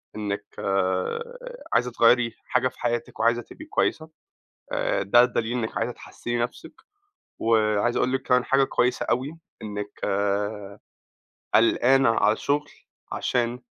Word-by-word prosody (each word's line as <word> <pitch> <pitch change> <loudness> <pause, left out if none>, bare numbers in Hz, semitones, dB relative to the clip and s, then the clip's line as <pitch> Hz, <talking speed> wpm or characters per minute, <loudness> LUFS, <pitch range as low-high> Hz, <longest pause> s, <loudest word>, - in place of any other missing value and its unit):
إنِك 100 -1 -3
آآ 465 - -2
عايزة 120 +1 +2
تغيّري 115 0 +4
حاجة 130 -1 +1
في 130 - -10
حياتِك 120 -1 -2
وعايزة 120 +1 +2
تبقي 310 - -12
كويّسة 160 - -1 0.6
آآ، - - 0
ده 120 +5 +6
دليل 120 0 -1
إنِك 110 -1 -4
عايزة - - -1
تحسِّني 120 0 -5
نفْسِك 120 +1 -5 0.6
وعايز 110 0 +2
أقول 130 +1 +1
لِك 135 - 0
كمان 125 0 +2
حاجة 135 0 +3
كويّسة 125 -1 0
أوي 135 +7 -1 0.2
إنِك 105 -1 -6 1.6
قلقانة 125 +3 +4
على 105 -1 +3
الشُّغل 145 +5 -1 0.4
عشان 120 0 -1
120 Hz, 125 wpm, -25 LUFS, 110-130 Hz, 1.6 s, ده